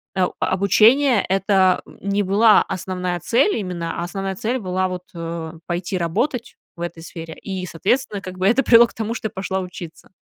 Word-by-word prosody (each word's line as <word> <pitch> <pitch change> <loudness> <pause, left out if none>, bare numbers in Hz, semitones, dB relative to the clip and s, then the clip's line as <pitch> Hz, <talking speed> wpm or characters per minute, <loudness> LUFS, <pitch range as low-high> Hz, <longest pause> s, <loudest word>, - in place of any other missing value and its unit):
а, 185 -1 +2
обучение- 220 +6 +4
это, 190 -1 +3
м, - - -16
не 200 +1 0
была 210 +3 +5
основная 180 -1 -3
цель 255 - +2
именно, 175 -5 -4
а - - -2
основная 195 +1 -4
цель 240 +7 -2
была 185 -1 -1
вот, 180 -1 -5
э, 165 -1 -5
пойти 175 +2 -2
работать 235 - -2 0.2
в - - -9
этой 170 -1 -5
сфере. 165 -1 -8
И, 190 -2 -4
соответственно, 200 +4 -1
как 185 -1 -8
бы, 185 - +1
это 245 +6 +3
привело 235 0 +7
к - - -17
тому, 225 0 -3
что 220 - -3
я - - -11
пошла 190 0 -2
учиться. 180 -1 -9
190 Hz, 185 wpm, -21 LUFS, 180-215 Hz, 0.2 s, привело